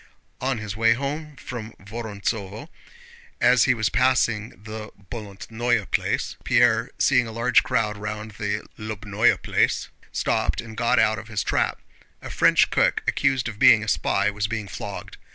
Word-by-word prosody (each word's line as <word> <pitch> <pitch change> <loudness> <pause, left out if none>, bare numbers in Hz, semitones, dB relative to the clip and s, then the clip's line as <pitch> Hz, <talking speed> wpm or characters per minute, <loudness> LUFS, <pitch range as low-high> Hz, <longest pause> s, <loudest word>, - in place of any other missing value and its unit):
On 130 -1 0
his 105 -2 -5
way 115 +1 +4
home 145 +4 -4
from 115 -4 -7
Vorontsóvo, 105 - -5 0.7
as 125 -1 +5
he 125 - +3
was 110 -2 0
passing 120 -3 +2
the 110 0 -7 0.2
Bolótnoe 110 +1 -2
Place - - -1
Pierre, 120 -1 +3
seeing 125 -4 +3
a - - -7
large 115 +3 +3
crowd 110 -4 -1
round 105 +1 -5
the 105 0 -3
Lóbnoe 105 +1 +1
Place, - - +1 0.2
stopped - - 0
and 115 -1 -7
got 115 +1 +1
out 110 +1 +3
of 110 - -11
his 105 -3 -2
trap. - - 0 0.4
A - - -9
French - - +4
cook - - +2
accused 135 -3 +1
of 110 -3 -7
being 110 -2 +7
a - - -7
spy 105 - +1
was 105 0 -2
being 110 -1 -4
flogged. - - -7
110 Hz, 155 wpm, -24 LUFS, 105-120 Hz, 0.7 s, being